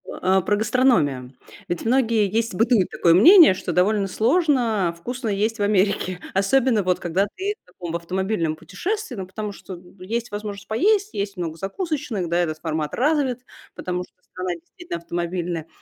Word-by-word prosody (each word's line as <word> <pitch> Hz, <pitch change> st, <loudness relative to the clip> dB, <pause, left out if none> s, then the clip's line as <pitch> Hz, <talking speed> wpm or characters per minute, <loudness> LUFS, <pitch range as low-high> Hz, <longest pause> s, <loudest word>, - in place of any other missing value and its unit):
А, 190 Hz, +1 st, +1 dB
про 205 Hz, +3 st, +1 dB
гастрономию. 205 Hz, -, +1 dB, 0.3 s
Ведь 175 Hz, +4 st, -3 dB
многие, 230 Hz, -3 st, +2 dB
есть 225 Hz, +2 st, -1 dB
бытует 225 Hz, -2 st, +3 dB
такое 170 Hz, -, +3 dB
мнение, 330 Hz, -, +8 dB
что 185 Hz, -, -4 dB
довольно 195 Hz, +3 st, +2 dB
сложно 230 Hz, -, +1 dB
вкусно 245 Hz, +6 st, -4 dB
есть 210 Hz, +3 st, -1 dB
в -, -, -2 dB
Америке, 200 Hz, -2 st, +1 dB
особенно 225 Hz, +4 st, +2 dB
вот 180 Hz, -1 st, +1 dB
когда 185 Hz, +4 st, 0 dB
ты 395 Hz, +2 st, -2 dB
в -, -, -67 dB
таком 175 Hz, -2 st, -7 dB
автомобильном 170 Hz, -1 st, -1 dB
путешествии. 360 Hz, -, -4 dB
Ну, 190 Hz, -3 st, -6 dB
потому 210 Hz, +2 st, -5 dB
что 190 Hz, -2 st, -10 dB, 0.2 s
есть 225 Hz, +5 st, -4 dB
возможность 205 Hz, -1 st, -6 dB
поесть, 400 Hz, -, +1 dB
есть 200 Hz, 0 st, -3 dB
много 165 Hz, -2 st, -4 dB
закусочных, 235 Hz, -, -3 dB
да, 170 Hz, -, +1 dB
этот 160 Hz, -3 st, -1 dB
формат 155 Hz, -2 st, -3 dB
развит, 265 Hz, -3 st, 0 dB, 0.3 s
потому 180 Hz, 0 st, -3 dB
что -, -, -19 dB
страна 185 Hz, -1 st, -4 dB
действительно 260 Hz, -, -8 dB
автомобильная, 170 Hz, -1 st, -3 dB
200 Hz, 160 wpm, -23 LUFS, 180-240 Hz, 0.3 s, мнение